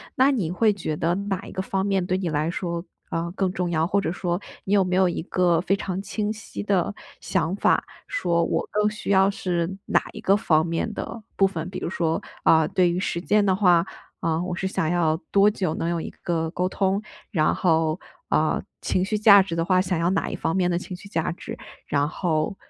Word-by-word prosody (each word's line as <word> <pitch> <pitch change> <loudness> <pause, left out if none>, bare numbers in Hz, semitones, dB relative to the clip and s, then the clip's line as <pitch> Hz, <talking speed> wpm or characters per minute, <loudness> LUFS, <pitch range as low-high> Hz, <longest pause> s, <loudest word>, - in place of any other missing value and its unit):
那 270 +1 +5
你 185 -11 -1
会 215 +3 +3
觉 165 -5 -3
得 170 +3 0
哪 200 -1 -2
一 - - -9
个 190 - -3
方 190 0 -1
面 195 -3 +1
对 185 +1 0
你 180 -3 -2
来 155 +2 0
说， 170 -1 -3 0.3
呃， 170 +1 -2
更 190 -2 0
重 180 -2 -2
要？ 160 0 +1
或 200 +2 +2
者 185 - -1
说， 175 0 -2 0.3
你 195 - 0
有 195 - +5
没 180 0 -1
有 185 -1 +4
一 170 - -3
个 175 -2 +2
非 195 - +1
常 195 -2 -3
清 210 +1 -2
晰 210 -1 -7
的 200 -1 +1 0.3
想 185 0 -1
法， - - +2 0.2
说 170 - +1
我 - - -1
更 210 0 +2
需 210 -1 -7
要 195 0 +5
是 175 -3 -1 0.2
哪 - - +3
一 215 - -9
个 200 -2 +4
方 160 -6 +3
面 170 +6 -2
的 225 +1 -6
部 195 - +4
分？ 170 -3 -5
比 - - -5
如 - - -3
说， 165 -3 -1 0.2
嗯， 160 -1 +5
对 180 -1 +5
于 180 - -1
时 170 - -2
间 210 +3 +2
的 190 -2 +3
话， 175 -4 +4 0.4
嗯， 165 +1 0
我 180 -1 -3
是 190 - -2
想 165 -4 -1
要 160 -3 +2
多 200 +1 +6
久 185 -6 -1
能 165 - -2
有 170 -1 -1
一 - - -6
个 165 -2 -1
沟 180 +1 -1
通？ 195 +1 0 0.3
然 155 -6 +2
后， 160 -1 +2 0.3
嗯， - - +1 0.2
情 185 - 0
绪 210 +2 -1
价 200 -2 +8
值 170 -3 -3
的 165 0 0
话， 185 0 +3
想 180 -1 -1
要 170 +2 +2
哪 195 - 0
一 - - -4
方 165 +3 -1
面 180 -2 +2
的 170 - +1
情 180 0 -6
绪 200 +2 -12
价 165 -2 -1
值？ 170 - -7 0.3
然 145 0 +1
后， 160 +2 -1
180 Hz, 245 characters per minute, -24 LUFS, 170-195 Hz, 0.4 s, 价